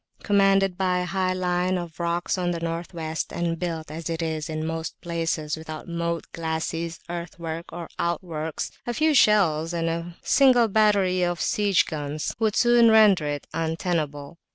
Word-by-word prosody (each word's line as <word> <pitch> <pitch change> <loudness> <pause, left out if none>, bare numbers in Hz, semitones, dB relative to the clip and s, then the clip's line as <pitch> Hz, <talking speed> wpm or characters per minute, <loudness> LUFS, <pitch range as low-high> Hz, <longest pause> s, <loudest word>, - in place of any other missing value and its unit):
Commanded 195 -2 +3
by 185 -1 +2
a 180 - -1
high 185 +1 0
line 180 0 0
of 170 -2 -7
rocks 170 0 0
on 180 -2 -1
the 170 -1 -2
North 165 +1 -4
West, 160 -2 -4
and 170 -1 -2
built 165 -4 -4
as 165 +2 -5
it 165 -1 -2
is 160 0 -3
in 155 0 -3
most 160 0 -4
places 165 -3 -2
without 160 +1 -8
moat, 170 -1 -2
glacis, 165 0 -3
earthwork, 170 -1 -6
or 170 -1 -6
outworks, 160 -2 -3 0.2
a 240 - -2
few 310 0 +3
shells 175 - +4
and 165 0 -1
a 170 +1 -4
single 255 -4 +5
battery 200 -3 +3
of 175 -1 0
siege 205 -3 +2
guns 150 0 -4
would 220 -2 +1
soon 240 -1 +5
render 210 -8 +5
it 145 -1 -3
untenable. 160 -2 -2
170 Hz, 165 wpm, -25 LUFS, 160-185 Hz, 0.2 s, single